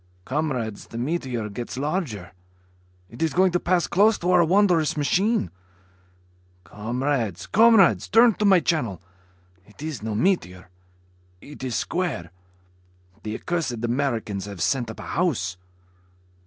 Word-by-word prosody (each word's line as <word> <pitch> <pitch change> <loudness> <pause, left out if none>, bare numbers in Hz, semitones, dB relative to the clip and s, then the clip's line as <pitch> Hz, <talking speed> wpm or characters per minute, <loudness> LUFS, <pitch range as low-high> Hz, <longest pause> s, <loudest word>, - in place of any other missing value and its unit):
Comrades, 130 -7 -3
the 115 - -8
meteor 125 -4 -2
gets 120 +4 -6
larger. 135 - -3 0.8
It 115 +8 -12
is 160 -1 +1
going 185 0 +4
to 175 - +1
pass 175 -1 +1
close 210 +4 +3
to 175 +1 -1
our 180 -1 +5
wondrous 175 -3 +2
machine. 180 - +1 1.1
Comrades... 115 - -2
Comrades... 220 -3 +5
turn 230 +2 +5
to 210 - 0
my 190 -3 +5
channel. 120 - -1 0.6
It 105 +8 -14
is 155 -8 -5
no 110 -1 -3
meteor 100 - -1 0.7
it 145 +4 -12
is 125 -3 -3
square. 145 - -2 0.9
The 110 0 -5
accursed 140 -10 -2
Americans 115 -6 -2
have 100 -3 -8
sent 125 -4 0
up 110 - -9
a - - -7
house. 110 - -1
140 Hz, 130 wpm, -24 LUFS, 110-175 Hz, 1.1 s, our